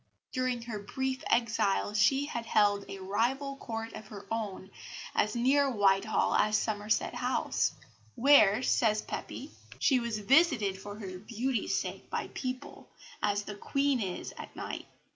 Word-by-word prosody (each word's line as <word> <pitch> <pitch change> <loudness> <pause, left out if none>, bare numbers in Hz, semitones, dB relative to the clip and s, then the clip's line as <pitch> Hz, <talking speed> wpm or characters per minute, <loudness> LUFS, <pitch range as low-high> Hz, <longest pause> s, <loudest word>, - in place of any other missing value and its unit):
During 255 -3 -1
her 230 -3 -5
brief 265 +5 -3
exile, 215 -3 +1
she 270 +6 +3
had 235 -5 -5
held 205 -2 +3
a 195 - -6
rival 240 +9 -1
court 225 -3 -5
of 215 -1 -9
her 205 -2 -10
own 205 -4 -4 0.4
as 210 +2 +1
near 275 +4 +3
Whitehall 205 -2 +2
as 215 0 +3
Somerset 215 0 0
House, - - 0 0.4
where, 250 -4 +6
says 215 -4 +2
Pepys, - - -6 0.3
"she 265 -3 +3
was 235 -2 -2
visited 215 - +3
for 205 0 -7
her 190 -4 -7
beauty's 235 +3 -1
sake - - -6
by - - -3
people, 255 -1 -6 0.3
as 205 0 +1
the 210 - -6
Queen 275 +5 0
is 185 -3 -4
at - - -9
nights. - - -5
220 Hz, 145 wpm, -30 LUFS, 205-255 Hz, 0.4 s, where